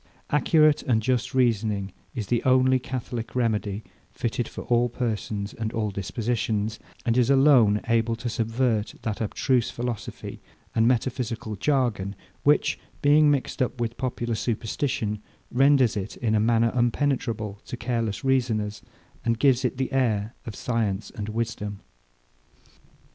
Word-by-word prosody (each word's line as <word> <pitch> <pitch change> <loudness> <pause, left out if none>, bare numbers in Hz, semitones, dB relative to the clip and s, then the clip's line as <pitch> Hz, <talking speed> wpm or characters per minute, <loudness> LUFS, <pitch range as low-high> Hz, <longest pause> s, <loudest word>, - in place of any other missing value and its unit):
Accurate 155 0 +4
and 120 -4 +2
just 125 +2 -1
reasoning 105 -6 +1 0.2
is 110 -5 -2
the 120 +3 +1
only 130 0 +4
catholic 120 -2 -5
remedy, 110 -4 0 0.3
fitted 120 0 -2
for - - -7
all 120 0 +2
persons 110 -4 -3
and 110 -1 -3
all 110 -2 -1
dispositions; 110 +2 -2 0.3
and 115 -2 +2
is 125 -1 +3
alone 135 -7 +5
able 115 0 +2
to 115 +2 -5
subvert 115 -1 0
that 110 -1 -3
abstruse 120 +3 +1
philosophy 120 -2 -5 0.3
and 115 +1 +3
metaphysical 120 -3 -1
jargon, 110 -5 0 0.3
which, 150 +1 +3 0.2
being 150 +1 +6
mixed 140 -3 0
up 125 0 -1
with 115 -1 -2
popular 120 -2 -2
superstition, 110 -1 -2 0.3
renders 135 -2 +4
it 100 -2 -4
in 115 -3 0
a 110 - +3
manner 115 +1 +3
impenetrable 120 -4 0
to 125 - -6
careless 115 -4 -2
reasoners, 115 -6 0 0.4
and 115 -1 +1
gives 130 0 +3
it 125 0 -1
the 130 -1 -1
air 115 -4 +1
of 110 - -5
science 110 -4 -1
and 105 0 -5
wisdom. 110 -2 -3
115 Hz, 135 wpm, -26 LUFS, 110-125 Hz, 0.4 s, being